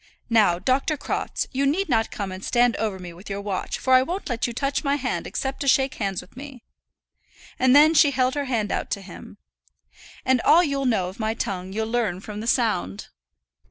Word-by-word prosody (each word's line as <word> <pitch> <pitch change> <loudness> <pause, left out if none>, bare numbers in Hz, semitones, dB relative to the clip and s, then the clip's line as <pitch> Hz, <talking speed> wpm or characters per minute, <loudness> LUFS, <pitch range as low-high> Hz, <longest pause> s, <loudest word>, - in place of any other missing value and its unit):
Now, 210 -7 +4
Dr. 270 - 0
Crofts, - - -3
you 275 +1 0
need 370 +8 0
not 225 -6 +1
come 200 -2 -5
and 185 +1 -8
stand 240 -1 +2
over 215 -3 -2
me 180 -2 -9
with 185 +5 -12
your 200 0 -3
watch, 200 -2 -3
for 260 - +1
I 255 - +7
won't 350 +7 -4
let 245 -1 -1
you - - -4
touch 275 +6 -2
my 280 -1 +1
hand 255 -3 -3
except 265 0 -4
to 280 - -3
shake 265 0 +3
hands 195 -3 -3
with - - -19
me;" 265 -2 -10 1.0
and 255 +1 +4
then 305 +2 +7
she 300 -2 +6
held 260 -1 +1
her 290 -1 -2
hand 225 -6 -1
out - - -2
to 200 - -2
him. 185 - -12 0.9
"And 260 -2 +3
all 340 +3 +5
you'll 280 -4 -1
know 200 -8 +1
of 190 - -13
my 220 0 -1
tongue 190 -5 -4
you'll 220 +2 -2
learn 225 -7 -1
from 210 +1 -8
the 225 - -5
sound." 100 - 0
240 Hz, 215 wpm, -24 LUFS, 200-275 Hz, 1.0 s, I